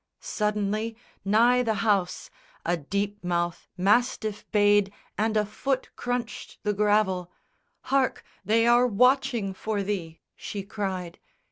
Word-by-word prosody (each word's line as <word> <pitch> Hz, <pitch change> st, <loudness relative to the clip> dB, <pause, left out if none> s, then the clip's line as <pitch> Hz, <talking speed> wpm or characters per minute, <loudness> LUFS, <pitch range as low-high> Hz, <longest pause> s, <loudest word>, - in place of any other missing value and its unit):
Suddenly, 210 Hz, +1 st, -1 dB, 0.3 s
nigh 235 Hz, +5 st, +4 dB
the 225 Hz, -3 st, 0 dB
house, 195 Hz, -4 st, 0 dB, 0.3 s
A 175 Hz, -, +2 dB
deep 200 Hz, +6 st, -3 dB
mouthed 175 Hz, -1 st, -1 dB
mastiff 210 Hz, +1 st, +1 dB
bayed 205 Hz, -1 st, +4 dB, 0.2 s
and 220 Hz, +1 st, +1 dB
a 210 Hz, -, +2 dB
foot 260 Hz, +6 st, -2 dB
crunched 245 Hz, -2 st, -4 dB
The 210 Hz, -, +1 dB
gravel. 205 Hz, -3 st, +1 dB, 0.5 s
"Hark! 270 Hz, -1 st, 0 dB, 0.2 s
they 225 Hz, +4 st, +3 dB
are 240 Hz, +1 st, +5 dB
watching 250 Hz, -2 st, +2 dB
for 205 Hz, +1 st, -2 dB
thee," 180 Hz, -5 st, -4 dB, 0.2 s
she 200 Hz, -2 st, -6 dB
cried. 190 Hz, -4 st, -4 dB
210 Hz, 120 wpm, -26 LUFS, 195-230 Hz, 0.5 s, are